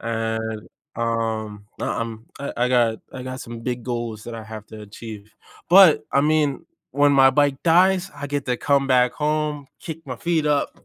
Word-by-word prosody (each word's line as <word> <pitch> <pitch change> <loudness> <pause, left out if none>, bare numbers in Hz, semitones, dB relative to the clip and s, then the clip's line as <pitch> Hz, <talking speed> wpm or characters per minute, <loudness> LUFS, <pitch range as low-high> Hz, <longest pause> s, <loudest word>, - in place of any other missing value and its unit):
and, 110 -1 -3 0.3
um, 110 -3 -2
I - - -1
I'm, 115 0 -4
I 140 - -5
I 125 +1 +1
got 120 -3 +2
I 130 - -7
got 130 0 -6
some 115 0 -8
big 120 0 -3
goals 120 -3 -4
that 120 - -7
I 110 - -7
have 110 -1 -9
to 110 - -10
achieve. 105 0 -10 0.4
But 180 -3 +7
I 140 - +4
mean, 150 -2 +1 0.3
when 145 +2 +4
my 135 -1 +6
bike 140 0 +2
dies, 185 +3 +4
I 145 0 -6
get 145 -1 -3
to 125 -1 0
come 140 +1 +1
back 125 -1 +3
home, 150 -1 -1
kick 165 -1 -8
my 125 -3 -5
feet 165 +2 0
up, 145 -1 -1
125 Hz, 190 wpm, -22 LUFS, 115-145 Hz, 0.4 s, But